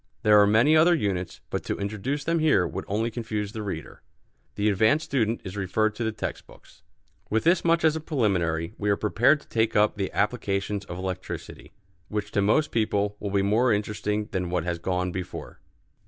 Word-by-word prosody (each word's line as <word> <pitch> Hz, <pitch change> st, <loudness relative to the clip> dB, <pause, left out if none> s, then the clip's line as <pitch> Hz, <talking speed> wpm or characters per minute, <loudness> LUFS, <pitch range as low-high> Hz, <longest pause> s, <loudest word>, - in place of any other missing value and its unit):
There 105 Hz, -1 st, +7 dB
are 100 Hz, -, +5 dB
many 115 Hz, +9 st, +4 dB
other 170 Hz, +3 st, +6 dB
units, 95 Hz, -, -2 dB
but -, -, -2 dB
to -, -, -2 dB
introduce 105 Hz, +8 st, -3 dB
them 165 Hz, +2 st, +1 dB
here 150 Hz, -, +3 dB
would -, -, -5 dB
only 110 Hz, +4 st, -1 dB
confuse 110 Hz, -3 st, -3 dB
the 110 Hz, -, -6 dB
reader. 90 Hz, -8 st, -6 dB, 0.5 s
The 105 Hz, -, 0 dB
advanced 110 Hz, +10 st, +3 dB
student 115 Hz, -4 st, 0 dB
is 95 Hz, 0 st, -7 dB
referred 105 Hz, +2 st, 0 dB
to 115 Hz, -, -4 dB
the 110 Hz, -, 0 dB
text 110 Hz, -, -5 dB
books. -, -, -19 dB, 0.5 s
With 110 Hz, +1 st, +1 dB
this 170 Hz, +2 st, +3 dB
much 170 Hz, 0 st, +2 dB
as 155 Hz, -1 st, +4 dB
a -, -, -2 dB
preliminary 90 Hz, -, 0 dB
we 105 Hz, -, 0 dB
are 100 Hz, -, +3 dB
prepared 120 Hz, +8 st, +3 dB
to -, -, -21 dB
take 115 Hz, -1 st, 0 dB
up 105 Hz, 0 st, +3 dB
the 95 Hz, -2 st, -2 dB
applications 100 Hz, -2 st, -1 dB
of 90 Hz, -, -7 dB
electricity, 95 Hz, 0 st, -6 dB, 0.4 s
which 105 Hz, 0 st, -4 dB
to 100 Hz, -, +1 dB
most 145 Hz, +10 st, +2 dB
people 105 Hz, -2 st, 0 dB
will 100 Hz, -, -4 dB
be 100 Hz, 0 st, +1 dB
more 110 Hz, +5 st, +3 dB
interesting 105 Hz, 0 st, -1 dB
than 90 Hz, -2 st, -2 dB
what 90 Hz, -2 st, -1 dB
has 85 Hz, -1 st, -3 dB
gone 90 Hz, +1 st, -1 dB
before. 90 Hz, -1 st, -7 dB
105 Hz, 200 wpm, -26 LUFS, 100-115 Hz, 0.5 s, There